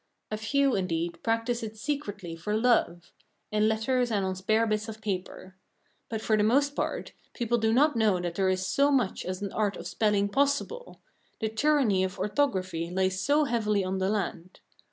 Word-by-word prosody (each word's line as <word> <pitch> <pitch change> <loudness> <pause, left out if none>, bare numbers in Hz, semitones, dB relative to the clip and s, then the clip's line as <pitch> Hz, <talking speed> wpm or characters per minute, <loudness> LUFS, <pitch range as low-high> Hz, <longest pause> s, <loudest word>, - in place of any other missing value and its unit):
A 215 - -1
few, 275 +4 +1
indeed, 170 -2 -2
practise 230 +1 0
it 220 -1 -6
secretly 205 - -4
for 210 +6 -2
love 220 -8 +1 0.4
in 215 0 +2
letters 245 +3 +1
and 205 -4 0
on 190 0 -2
spare 215 +4 +1
bits 215 0 -1
of 220 0 -8
paper. 190 -2 -5 0.5
But, 220 -1 -3
for 220 - +2
the 210 - +2
most 280 +6 +2
part, - - -3 0.2
people 240 -1 0
do 220 0 +2
not 290 +4 +4
know 215 -5 +3
that 175 -1 -3
there 190 +1 +1
is 185 0 0
so 280 +7 +3
much 255 -9 +1
as 185 +2 -4
an 200 - -3
art 210 -2 0
of - - -8
spelling 210 -2 +1
possible; 285 - -1 0.4
the 220 - -1
tyranny 225 -5 +2
of 185 -1 -3
orthography 190 - -1
lies 185 +1 0
so 295 +7 +3
heavily 215 -7 +1
on 190 +1 -2
the 190 +1 +1
land. 185 -3 -3
215 Hz, 185 wpm, -28 LUFS, 190-240 Hz, 0.5 s, not